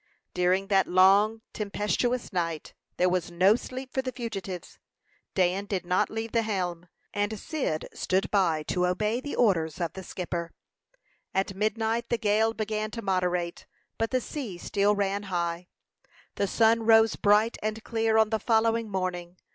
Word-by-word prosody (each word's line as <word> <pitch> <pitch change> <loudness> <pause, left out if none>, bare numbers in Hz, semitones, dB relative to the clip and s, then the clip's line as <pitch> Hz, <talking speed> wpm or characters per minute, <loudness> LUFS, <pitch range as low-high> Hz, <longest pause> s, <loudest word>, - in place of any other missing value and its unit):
During 180 +2 +2
that 195 -1 +3
long, 200 +5 +4
tempestuous 215 +4 -1
night, 165 -3 -2 0.2
there 180 - +3
was 180 -1 0
no 185 +4 +4
sleep 255 +2 -7
for 265 - +1
the 260 -1 -4
fugitives. 200 -7 -6 0.6
Dan 185 +1 +1
did 195 -3 -3
not 180 +1 +1
leave 225 0 -4
the 230 - +2
helm, 180 -5 -3 0.3
and 205 +1 -1
Cyd 255 - -3
stood 190 +1 -1
by 170 -6 +2
to 180 +3 0
obey 210 +6 0
the 290 - -5
orders 165 -9 +2
of 170 -2 -2
the 190 - -7
skipper. 170 -2 -5 0.8
At 195 0 0
midnight 220 +3 -1
the 235 - +1
gale 220 +1 +2
began 215 0 -2
to 230 +1 -7
moderate, 180 -2 -1 0.3
but 225 0 +1
the 255 -1 0
sea 240 - -6
still 205 +3 +1
ran 200 0 0
high. 170 -1 -2 0.7
The 200 - -1
sun 225 +2 +3
rose 225 -1 +6
bright 210 +3 +3
and 215 +1 -3
clear 225 -1 +1
on 220 0 +4
the 220 - +1
following 225 0 +2
morning. 180 -2 -3
205 Hz, 160 wpm, -27 LUFS, 180-225 Hz, 0.8 s, rose